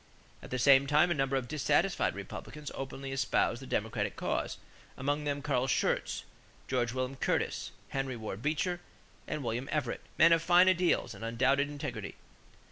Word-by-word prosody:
At - - -10
the 130 - -2
same 135 +2 +6
time 150 +5 +4
a - - +5
number 135 -3 0
of 130 -2 -1
dissatisfied 150 +1 +1
Republicans 150 0 -7
openly 135 0 -6
espoused 125 -2 +1
the 135 - -9
Democratic 105 -1 -1
cause, - - -2 0.4
among 145 +3 -1
them 145 -1 -2
Carl 130 -3 +1
Schurz, - - 0 0.4
George 120 -3 0
William 130 +1 -2
Curtis, - - -1 0.2
Henry 135 -2 -2
Ward 110 -2 -6
Beecher, 175 +5 0 0.5
and 155 -2 -3
William 120 +3 -3
Everett, 150 -2 -1 0.2
men 165 - +7
of 165 - +3
fine 175 +2 +6
ideals 180 -1 +2
and - - -10
undoubted 135 +5 +2
integrity. 140 -9 -5
135 Hz, 160 wpm, -31 LUFS, 125-150 Hz, 0.5 s, men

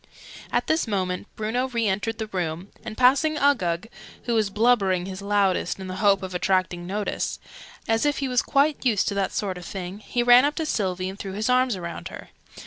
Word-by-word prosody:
At - - +1
this 315 -5 +1
moment 185 -2 -2
Bruno 230 +4 -1
re 235 -3 -1
entered 205 +3 -1
the 220 - -3
room, 180 -2 -4
and 220 -1 -7
passing 280 +5 +4
Uggug 200 - +1 0.4
(who 240 - -1
was 215 -3 +2
blubbering 200 -4 +2
his 190 0 -7
loudest, 200 -2 +1
in 190 - -6
the 185 0 -6
hope 200 -1 +3
of 185 -1 -5
attracting 180 -1 0
notice) 205 +2 -2 0.5
as 225 0 +2
if 290 -1 +1
he 275 - -1
was 250 -1 +2
quite 285 +1 +1
used 225 -7 +2
to - - -3
that 200 -1 -1
sort 190 -3 -3
of 175 - -11
thing, 190 +1 -6
he 240 +3 -1
ran 245 +1 +7
up 290 +1 +1
to 320 - -2
Sylvie 185 -9 -1
and 190 +1 -7
threw 195 -1 -5
his 215 +5 0
arms 250 -4 +2
round 170 -1 -6
her. - - -10
205 Hz, 210 wpm, -24 LUFS, 185-245 Hz, 0.5 s, ran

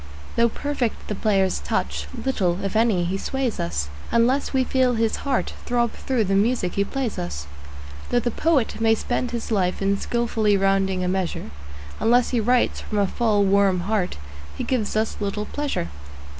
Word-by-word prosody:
Though 235 0 +4
perfect 270 -2 -3
the - - 0
player's 195 -3 +1
touch, 70 +2 -2 0.2
little, 190 -9 0
if 195 - -3
any, 220 -5 +3
he 190 +3 -2
sways 265 -1 -2
us, 70 -4 -1 0.2
Unless 250 +4 +2
we 265 -1 +2
feel 255 -1 +2
his 225 -1 +1
heart 275 -3 -1
throb 240 -1 +1
through 255 -4 -1
the 195 -1 0
music 200 -2 +2
he 200 - +2
plays 260 0 -3
us. 70 -5 -4 0.6
Though 245 - +3
the 240 0 -1
poet 280 -6 +1
may 225 0 +4
spend 245 +2 -2
his 235 -1 -4
life 185 -4 +1
in 195 0 +1
skilfully 225 -3 +1
rounding 195 -1 +1
a - - 0
measure, 180 - -2 0.5
Unless 240 +1 +3
he 245 - +2
writes 245 +3 +2
from 215 - -4
a 200 - +4
full, 210 0 +2
warm 195 -2 +3
heart 195 -1 -1 0.4
he - - -2
gives 235 -6 -1
us 220 +1 0
little 210 0 -2
pleasure. 285 - -3
215 Hz, 175 wpm, -23 LUFS, 195-240 Hz, 0.6 s, Though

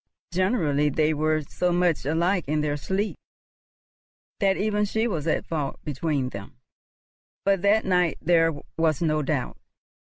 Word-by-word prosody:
Generally 165 - +2
they 155 +2 +1
were 155 +1 +1
so 180 +5 -1
much 175 -5 +1
alike 170 +4 +1
in 150 +1 +1
their 150 -1 0
sleep 190 +8 -2 1.2
that 195 -2 +2
even 210 0 +1
she 220 +3 0
was 165 -8 -3
at 155 - 0
fault 150 -4 -3
between 145 -2 -1
them; 100 +2 -9 0.9
but 195 -2 +2
that 205 +3 +3
night 180 -3 +2
there 165 -1 +3 0.3
was 160 0 +2
no 155 -1 +1
doubt. - - -2
165 Hz, 140 wpm, -25 LUFS, 150-190 Hz, 1.2 s, that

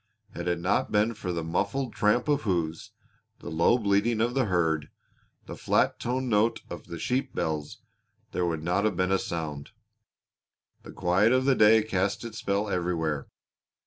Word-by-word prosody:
Had 85 0 -5
it 85 -1 0
not 90 +4 0
been 105 +2 +2
for 100 -4 -5
the 85 -1 -3
muffled 100 +9 -1
tramp 115 +3 +2
of 145 -1 +2
hoofs, 85 - -2 0.5
the - - -8
low 85 +9 +3
bleating 110 +1 +1
of 120 +2 +1
the 135 -1 +1
herd, 80 -6 0 0.6
the - - -7
flat - - +1
toned 130 +2 -2
note 110 0 +2
of - - -8
the 85 - -6
sheep 125 - -2
bells, 75 -2 -3 0.5
there 90 -1 0
would 80 -2 -2
not 90 +4 +1
have 110 - 0
been 90 +1 +1
a 95 - +3
sound. 75 -4 -5 1.1
The - - -11
quiet 95 +6 +2
of 130 0 +2
the 135 - +5
day 110 -2 +5
cast 100 +1 -1
its 110 -1 -7
spell 100 +1 -1
everywhere. 85 -6 -1
100 Hz, 175 wpm, -27 LUFS, 85-115 Hz, 1.1 s, the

